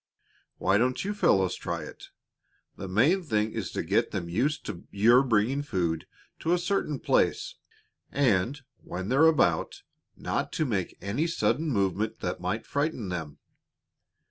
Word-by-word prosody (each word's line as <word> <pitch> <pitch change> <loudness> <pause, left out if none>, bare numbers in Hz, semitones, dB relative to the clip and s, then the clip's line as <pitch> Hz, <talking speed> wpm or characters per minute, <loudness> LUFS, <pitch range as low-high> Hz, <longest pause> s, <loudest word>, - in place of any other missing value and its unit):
Why 100 +2 +2
don't 130 +7 0
you 205 - -1
fellows 95 - +3
try 85 -3 -4
it? - - -11 0.7
The 95 - -7
main 135 - +3
thing 110 -9 0
is - - -4
to - - -2
get - - +1
them 85 -3 -4
used 130 - 0
to 85 - -7
your 115 +5 +5
bringing 125 +2 +1
food 85 - -2 0.3
to 165 - +1
a - - +4
certain 175 -6 -1
place, - - +1 0.6
and, 130 +1 +1
when 95 +3 -6
they're 140 +6 +5
about, 160 -2 +1 0.3
not - - -2
to 155 - 0
make 100 -9 -2
any 110 - -1
sudden 155 0 0
movement 105 -1 0
that 90 -1 -3
might 95 +5 -2
frighten 145 - -2
them. 80 -5 -5
110 Hz, 150 wpm, -28 LUFS, 95-145 Hz, 0.7 s, your